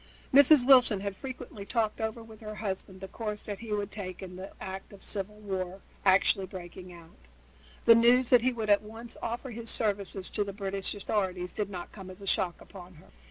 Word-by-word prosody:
As 280 0 +8
Mrs. 295 -6 +7
Wilson 250 -7 +6
had 200 -1 -3
frequently 250 -4 -7
talked 220 0 -1
over 220 +1 -3
with 220 -1 -14
her 215 -1 -6
husband 190 -2 -4
the 190 - -5
course 210 0 -5
that 205 -2 -5
he 230 -2 -8
would 205 -1 -1
take 190 -3 -6
in 180 -1 -8
the 185 +2 -7
event 190 0 -7
of 200 -1 -14
civil 205 0 -3
war 190 -3 -4 0.2
actually 190 0 +4
breaking 180 0 -9
out, 170 -1 -14 0.7
the 230 - +10
news 240 +2 +5
that 245 -2 +7
he 255 +2 +2
would 220 -3 -1
at 205 - +6
once 225 +2 -9
offer 240 +3 -4
his 230 0 -5
services 200 -3 -1
to 205 - +1
the 200 -1 -6
British 195 0 -2
authorities 185 -3 -2
did 210 -2 -2
not 180 -3 -7
come 190 -3 -10
as 185 +1 -10
a 200 - -9
shock 180 -2 +1
upon 185 -2 -12
her. 150 - -18
205 Hz, 210 wpm, -30 LUFS, 190-225 Hz, 0.7 s, the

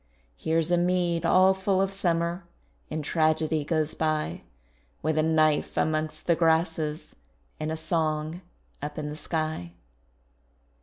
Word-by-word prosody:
Here's 160 - 0
a 175 - +4
mead 175 -2 +1
all 185 +2 +6
full 190 0 0
of 195 0 +1
summer, 170 -1 0 0.5
And 155 -1 -4
tragedy 155 -1 +1
goes 155 0 0
by 155 - -1 0.6
With 155 +1 +1
a 155 - +3
knife 155 -1 +2
amongst 155 0 0
the 170 - +3
grasses, 160 -2 0 0.5
And 155 0 -2
a 160 - -2
song 160 0 -1 0.4
up 150 +1 -5
in 150 -1 -3
the - - -6
sky. 155 - -3
160 Hz, 135 wpm, -27 LUFS, 155-170 Hz, 0.6 s, all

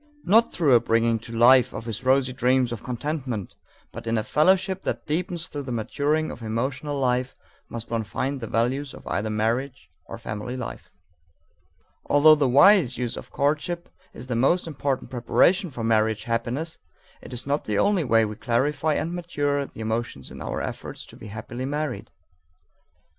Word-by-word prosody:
Not 225 +5 +4
through 150 -6 +3
a 120 - +8
bringing 115 0 +2
to 115 - -10
life 120 +2 +5
of 115 - -6
his 115 0 -4
rosy 130 0 +3
dreams 125 -1 +2
of 120 - -5
contentment, 125 - -4 0.4
but - - -9
in 115 0 +1
a 110 - 0
fellowship 190 - +2
that - - -3
deepens 170 +2 -2
through 145 -3 -6
the 130 -2 -6
maturing 145 +7 0
of - - -10
emotional 130 +6 -2
life, 125 0 0 0.3
must 115 0 -6
one 115 -1 0
find 130 +7 -3
the 115 - -4
values 130 +6 -1
of - - -13
either 110 +2 -2
marriage 115 -1 -2 0.2
or - - -7
family 105 +5 -5
life. 125 - -7 1.2
Although 150 +2 +7
the 145 -4 +2
wise 145 - +6
use 120 -1 -2
of - - -9
courtship 155 +5 -1 0.2
is 120 - -10
the 125 -2 -3
most 135 +10 +3
important 140 -4 -3
preparation 170 +9 +2
for 120 -5 -6
marriage 110 -1 +2
happiness, 120 +8 -2 0.4
it - - -11
is 120 - -4
not 140 +2 -1
the 105 -2 -1
only 200 - +3
way 115 -4 +3
we 105 0 -5
clarify 145 +7 0
and 165 +3 -2
mature 145 -5 -1
the - - -11
emotions 110 - -3
in - - -9
our - - -3
efforts - - -6
to - - -14
be - - -11
happily 110 +4 -6
married. 145 -1 -3
130 Hz, 175 wpm, -25 LUFS, 115-150 Hz, 1.2 s, a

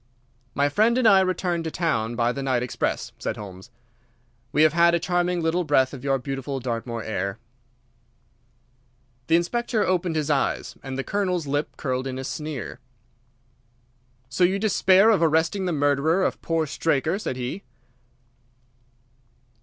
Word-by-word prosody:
"My 140 +1 +3
friend 220 - +2
and 255 -3 +4
I 195 -3 +7
return 185 -2 0
to 165 - -3
town 120 -10 -1
by 120 0 +1
the 140 - -5
night 130 -3 0
express," 125 - -2
said - - -3
Holmes. 100 +1 -10 0.8
"We 150 - +4
have 155 -1 +4
had 170 0 +5
a - - +1
charming 175 0 0
little 165 +2 +1
breath 135 -4 +2
of 135 -2 -8
your 135 -1 +1
beautiful 135 +1 -4
Dartmoor 115 -2 -4
air." 100 -1 -3 1.9
The 165 - +4
Inspector 230 +7 0
opened 180 -2 0
his 155 -1 0
eyes, 140 -2 -1
and 135 -1 -6
the 135 - -2
Colonel's 180 -4 -1
lip 145 +2 -2
curled 130 -1 -2
in 130 -1 -4
a 130 - -5
sneer. 150 -3 -5 1.5
"So 130 +8 0
you 185 +2 +3
despair 200 0 +4
of 210 - +2
arresting 165 +4 +2
the 180 - 0
murderer 145 +4 +2
of - - -1
poor 165 -1 0
Straker," 160 +4 0
said 170 - -3
he. 130 +10 -4
155 Hz, 155 wpm, -24 LUFS, 130-180 Hz, 1.9 s, I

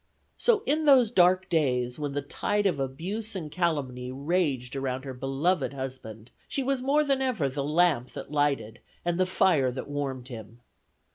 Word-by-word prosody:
So 445 -4 +2
in 310 +2 +1
those 255 -6 +6
dark 185 -2 +4
days, 125 -6 0
when 145 -2 -3
the 145 0 -2
tide 205 +8 -1
of 175 -8 +1
abuse 185 +12 -4
and 160 -5 -5
calumny 135 -8 -1
raged 140 -3 -1
around 130 -1 -3
her 135 - -5
beloved 135 +7 0
husband, 125 -4 -7 0.2
she 275 - -2
was 270 0 0
more 285 +3 +3
than 275 -2 +1
ever 235 - 0
the 140 +1 -3
lamp 150 -4 +2
that - - -8
lighted 140 -7 0 0.3
and 175 0 0
the 185 - +3
fire 165 -8 +3
that 125 +1 -5
warmed 135 -3 -4
him. 115 -1 -10
145 Hz, 170 wpm, -27 LUFS, 130-185 Hz, 0.3 s, those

